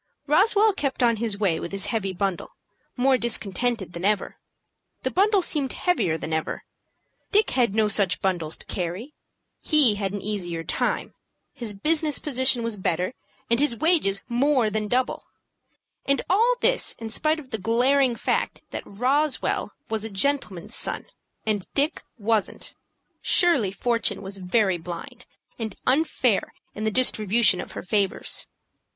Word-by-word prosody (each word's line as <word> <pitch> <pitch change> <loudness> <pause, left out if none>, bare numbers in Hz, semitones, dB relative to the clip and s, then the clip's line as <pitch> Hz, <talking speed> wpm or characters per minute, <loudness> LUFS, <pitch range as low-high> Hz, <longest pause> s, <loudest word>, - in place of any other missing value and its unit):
Roswell 410 +7 +4
kept 275 -7 -2
on 235 -2 +3
his 215 -2 0
way 190 -6 +1
with 170 - -6
his 195 0 -3
heavy 195 -4 -1
bundle, 190 -1 -3 0.4
more 260 +1 +3
discontented 225 -3 -1
than 170 - -7
ever. 205 0 0 0.7
The - - -1
bundle 400 0 +3
seemed 285 -6 -1
heavier 185 - 0
than 160 0 -5
ever. 160 0 -2 0.7
Dick 420 +2 +3
had 235 -6 +1
no 220 -1 +3
such 200 -3 +2
bundles 175 -5 -2
to - - -11
carry. 185 - -4 0.5
He 295 -8 +5
had 195 -2 -2
an 205 - -4
easier 175 -6 -3
time, - - -2 0.4
his 225 -4 -5
business 305 +6 +1
position 260 -3 +1
was 230 -2 -3
better, 180 +2 -1 0.3
and 235 +1 +2
his 290 -4 +2
wages 295 - +2
more 250 -2 +2
than 215 0 -1
double. 250 +4 0 0.8
And 275 0 +1
all 460 +6 +4
this - - +1
in 225 -1 -7
spite 310 +7 +1
of 270 -4 -13
the 220 - -3
glaring 245 +5 +2
fact - - -2
that - - -4
Roswell 265 +7 0 0.2
was 220 -1 -2
a 220 - -3
gentleman's 200 -4 -1
son, - - -1 0.4
and 210 -3 -1
Dick 295 +3 +1 0.2
wasn't. 220 -1 -1 0.5
Surely 305 - +4
fortune 230 -2 -1
was 195 0 -5
very 190 -1 +1
blind, 170 0 -8 0.3
and 220 -4 -4
unfair 260 -6 +1 0.2
in 215 - -5
the - - +2
distribution 215 -4 +3
of - - -10
her - - -6
favors. 195 +1 0
225 Hz, 150 wpm, -24 LUFS, 195-275 Hz, 0.8 s, He